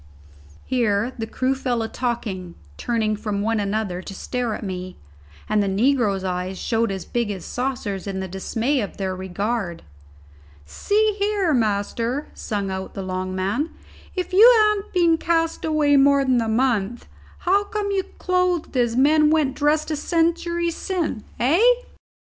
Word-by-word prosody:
Here 235 -1 +1
the 225 - -3
crew 260 +3 0
fell 250 -3 -1
a - - -2
talking, 215 -8 -3 0.2
turning 220 - 0
from 205 -1 -3
one 225 0 +1
another 200 -3 -2
to 195 +1 -9
stare 245 +1 -2
at - - -8
me, 185 -2 -5 0.5
and 215 -1 +2
the 200 - 0
negroes' 205 -1 +2
eyes 185 0 -3
showed 225 +1 0
as 190 -1 -5
big 235 -3 -1
as 190 -4 -5
saucers 245 -7 -3
in 195 -1 -3
the 190 - -3
dismay 225 +9 -1
of 205 - -6
their 190 -1 -2
regard. 190 0 -3 0.8
"See, 420 - +1
here, 400 -5 +1
master," 230 +4 -1
sung 200 -3 -3
out 190 0 -5
the 195 - -4
long 185 0 -3
man, 200 - -1 0.5
"if 365 -1 -3
you 445 +6 +9
han't 425 -1 0
been 340 -3 +3
cast 330 -1 0
away 300 -2 +3
more 280 0 +5
than 255 -2 +3
a 225 - -1
month, 235 -2 0 0.3
how 395 +3 +3
come 410 -1 -2
you 390 -1 +1 0.2
clothed 365 -4 0
as 240 -2 +2
men 300 +4 +5
went 305 -4 +2
dressed 305 +2 +1
a - - +1
century 340 +2 0
sin', 335 - -3
hey?" 285 - +3
240 Hz, 160 wpm, -23 LUFS, 200-315 Hz, 0.8 s, you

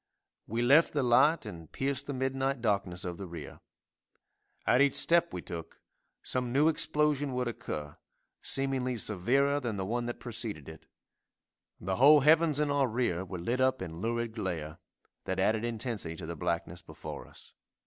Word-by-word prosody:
We 115 +3 -1
left 140 +7 +5
the 145 -3 +1
light 125 +5 +4
and 85 -7 -9
pierced 135 -1 -2
the 140 - -3
midnight 135 +1 -1
darkness 100 -5 -1
of 85 -1 -5
the 95 - -6
rear. 85 -3 -9 1.1
At 125 - +4
each 140 -1 +3
step 170 0 +3
we 90 - -6
took 80 -1 -8 0.4
some 125 -1 -1
new 145 +5 +4
explosion 150 -3 +1
would 125 -1 -1
occur, 75 -10 -5 0.4
seemingly 135 -2 +1
severer 125 +8 +2
than 120 -6 -3
the 95 - -2
one 120 +4 -2
that 120 - -5
preceded 110 - -3
it; 80 0 -12 0.9
the 95 +2 -2
whole 145 +3 +7
heavens 155 0 +4
in 150 -1 +1
our 140 -2 +2
rear 110 -7 -1
were 95 -1 -6
lit 120 +9 -1
up 130 0 +2
in 85 -2 -7
lurid 115 +1 -1
glare, 85 -7 -4 0.5
that - - -2
added 110 +1 +2
intensity 115 -7 -3
to 80 - -8
the 85 +1 -5
blackness - - -3
before - - -9
us. - - -16
120 Hz, 170 wpm, -30 LUFS, 95-135 Hz, 1.1 s, whole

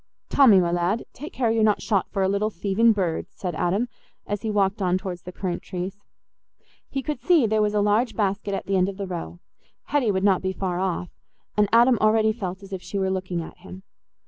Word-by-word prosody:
"Tommy, 240 -9 +6
my 175 -1 +1
lad, 175 +6 0
take 295 +5 -8
care 240 -4 0
you're 225 0 +1
not 210 -1 +3
shot 200 -4 0
for 195 -1 -1
a - - +3
little 200 +2 0
thieving 205 +4 +2
bird," 185 -6 -1
said 180 -2 -5
Adam, 180 +9 0 0.4
as 205 -1 -3
he 225 - -3
walked 200 0 +1
on 180 -1 +2
towards 185 -2 -6
the 180 - -9
currant 180 -1 -4
trees. 185 +2 -5 0.9
He 270 -1 -3
could 300 -3 -4
see 315 0 +4
there 215 0 +2
was 210 0 +1
a 205 - +3
large 210 +4 +2
basket 200 -1 -1
at - - -5
the 195 0 +1
end 185 +1 +2
of 195 - -7
the 200 - -3
row: 85 - -6 0.5
Hetty 285 -6 +2
would 190 -1 0
not 195 -2 +3
be 190 0 -2
far 180 -2 -2
off, 180 -2 -2 0.4
and 210 -1 +3
Adam 235 0 +5
already 215 0 +4
felt 190 -3 -5
as 195 0 -10
if 190 - -4
she 200 - -5
were 190 -1 0
looking 185 -2 -2
at 170 - -12
him. 190 +1 -11
195 Hz, 225 wpm, -24 LUFS, 185-215 Hz, 0.9 s, Tommy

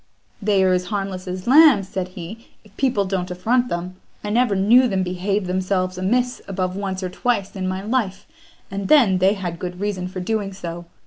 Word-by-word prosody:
"They 200 -2 +2
are 185 -1 +3
as 180 0 0
harmless 195 -2 -4
as 185 0 -5
lambs," 265 -7 +6
said 185 -1 -3
he, 190 +7 -8 0.2
"if 210 -1 -21
people 250 -7 +1
don't 185 -1 -2
affront 230 +8 +1
them. 180 +2 -4 0.3
I 210 - -3
never 235 -2 +2
knew 230 +7 +5
them 190 -4 0
behave 185 +2 -1
themselves 185 0 -1
amiss 245 +7 0
above 185 -1 -2
once 190 -1 -3
or 185 - -2
twice 205 0 -1
in 185 -1 -3
my 185 +1 -3
life, 215 -4 -1 0.5
and 195 0 -3
then 230 -12 +5
they 190 +2 +4
had 175 -4 -5
good 180 0 -5
reason 195 -3 -2
for 185 0 -6
doing 200 +1 -2
so. 175 -2 -7
195 Hz, 195 wpm, -21 LUFS, 185-210 Hz, 0.5 s, lambs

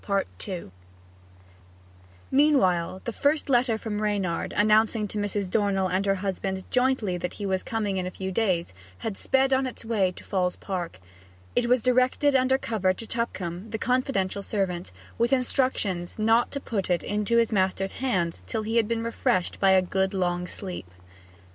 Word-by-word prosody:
Meanwhile 190 - +3
the 235 - -3
first 285 +4 +1
letter 240 -2 +3
from 215 -1 -4
Reynard, 200 -5 -1
announcing 215 +1 +3
to 210 - -3
Mrs. 205 -1 -1
Dornell 195 -1 +1
and 190 +2 0
her 195 - +3
husband 190 0 -3
jointly 250 -7 +1
that 180 - -4
he 205 - -5
was 190 -1 0
coming 210 -4 -2
in 180 -1 -1
a - - -2
few 190 +1 -5
days, 185 - 0 0.3
had 220 - -2
sped 265 +5 +2
on 265 0 +2
its 245 - -8
way 205 -5 +1
to - - -12
Falls 180 -2 0
Park. 175 - -5 0.6
It 240 -1 +2
was 250 -1 +3
directed 255 +3 +3
under 260 0 +4
cover 205 -7 0
to 225 - -5
Tupcombe, 195 -5 -4
the 220 - -3
confidential 235 -6 0
servant, 190 -3 -2 0.3
with 235 +2 +2
instructions 250 -9 0
not 225 +2 +3
to 280 - -4
put 210 -8 -3
it 175 -1 +1
into 210 +3 0
his 230 -1 +3
master's 195 -1 +1
hands 180 - -1
till 215 - -2
he 225 +2 -1
had 225 -2 +3
been 230 0 -1
refreshed 185 -5 0
by 195 - +4
a 190 -1 +5
good 190 +2 0
long 180 -1 0
sleep. 180 - -6
205 Hz, 165 wpm, -26 LUFS, 185-235 Hz, 0.6 s, a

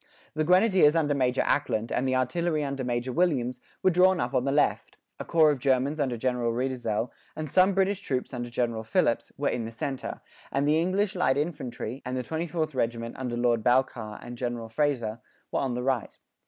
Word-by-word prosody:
The 155 - 0
grenadiers 180 -2 +5
under 150 -3 +2
Major 130 -2 +1
Ackland, 115 -6 0
and 130 - 0
the 130 - +1
artillery 155 +5 0
under 140 -1 -3
Major 120 +1 -2
Williams, 130 -8 +1 0.2
were 185 - +5
drawn 185 +1 +4
up 120 - -2
on 125 - +1
the 135 - +1
left; 145 +1 +1 0.2
a - - -3
corps 160 -2 +5
of 145 - -2
Germans 135 +3 +1
under 130 -4 0
General 125 -1 0
Reidesel, 120 -2 -2 0.2
and 155 0 -4
some 185 +6 +4
British 195 0 +2
troops 130 -8 -3
under 120 -1 -4
General 120 -2 -1
Phillips, - - +1
were - - 0
in 120 - -2
the 110 - -6
centre; 130 +4 -5 0.3
and 140 +1 +1
the 155 +2 +3
English 190 +3 0
light 160 -7 +2
infantry, 135 -5 -4
and 125 0 -3
the 125 - -2
24th 160 +1 -2
regiment 115 -2 -2
under 125 -2 -3
Lord 120 -2 +2
Balcarres 120 -4 0
and 120 0 -8
General 120 -2 -3
Fraser, 120 -4 -1 0.3
were - - 0
on 130 -3 -1
the 125 - -3
right. 130 -3 -1
130 Hz, 195 wpm, -27 LUFS, 120-155 Hz, 0.3 s, grenadiers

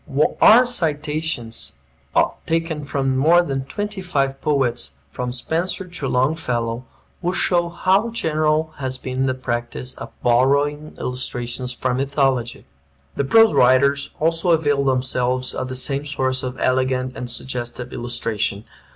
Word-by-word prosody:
Our 240 +4 +8
citations, 155 - -2 0.7
taken 165 -2 -1
from 135 -2 -1
more 165 +6 +5
than 135 -4 -3
twenty 205 +5 -4
five 135 -6 -1
poets, 120 - 0 0.2
from 125 - -3
Spenser 165 +9 -1
to 175 -6 -3
Longfellow, 125 -3 0 0.4
will 180 +1 0
show 175 -1 +1
how 190 +6 +2
general 155 -6 0
has 130 -2 -3
been 130 +1 -2
the 130 - 0
practice 125 0 -4
of - - -9
borrowing 140 +5 +2
illustrations 125 0 -3
from 125 0 -1
mythology. 135 -3 0 0.5
The 140 - 0
prose 225 +8 +6
writers 140 +3 +4
also 165 +3 +1
avail 145 -4 +3
themselves 130 -1 0
of 130 - -3
the 130 - -5
same 140 +3 -2
source 130 -2 -1
of 130 0 -5
elegant 130 0 0
and 125 - -5
suggestive 120 0 -5
illustration. 115 -3 -2
135 Hz, 130 wpm, -21 LUFS, 125-155 Hz, 0.7 s, Our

